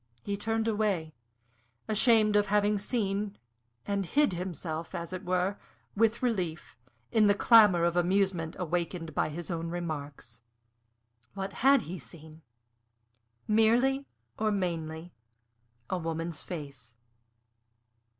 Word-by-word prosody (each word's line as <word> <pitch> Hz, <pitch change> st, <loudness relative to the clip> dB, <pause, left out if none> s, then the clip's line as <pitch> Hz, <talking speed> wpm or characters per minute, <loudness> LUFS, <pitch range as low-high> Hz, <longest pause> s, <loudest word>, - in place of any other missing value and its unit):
He 200 Hz, -, -2 dB
turned 225 Hz, +2 st, -1 dB
away, 205 Hz, -8 st, 0 dB, 0.7 s
ashamed 215 Hz, -1 st, +4 dB
of 205 Hz, 0 st, +3 dB
having 205 Hz, 0 st, +2 dB
seen, 205 Hz, -2 st, -2 dB, 0.5 s
and 200 Hz, -1 st, -1 dB
hid 285 Hz, -, +2 dB
himself, 170 Hz, -1 st, -5 dB
as 170 Hz, 0 st, -5 dB
it 185 Hz, +1 st, -5 dB
were, 185 Hz, +2 st, 0 dB, 0.4 s
with 225 Hz, +3 st, +2 dB
relief, 180 Hz, -, -2 dB, 0.4 s
in 215 Hz, -2 st, +4 dB
the 205 Hz, -, +4 dB
clamor 210 Hz, -6 st, +6 dB
of 170 Hz, 0 st, +1 dB
amusement 180 Hz, -2 st, +1 dB
awakened 170 Hz, -1 st, -3 dB
by -, -, 0 dB
his 170 Hz, +3 st, -6 dB
own 165 Hz, 0 st, -3 dB
remarks. 145 Hz, -8 st, -6 dB, 0.9 s
What 195 Hz, 0 st, -4 dB
had 270 Hz, -1 st, +4 dB
he 175 Hz, +3 st, -6 dB
seen? 155 Hz, +5 st, -13 dB, 1.1 s
Merely, 240 Hz, +6 st, +3 dB, 0.3 s
or 215 Hz, 0 st, +1 dB
mainly, 170 Hz, -3 st, -3 dB, 0.7 s
a 185 Hz, -, -2 dB
woman's 165 Hz, -1 st, -4 dB
face. 140 Hz, -9 st, -8 dB
185 Hz, 115 wpm, -29 LUFS, 165-210 Hz, 1.1 s, clamor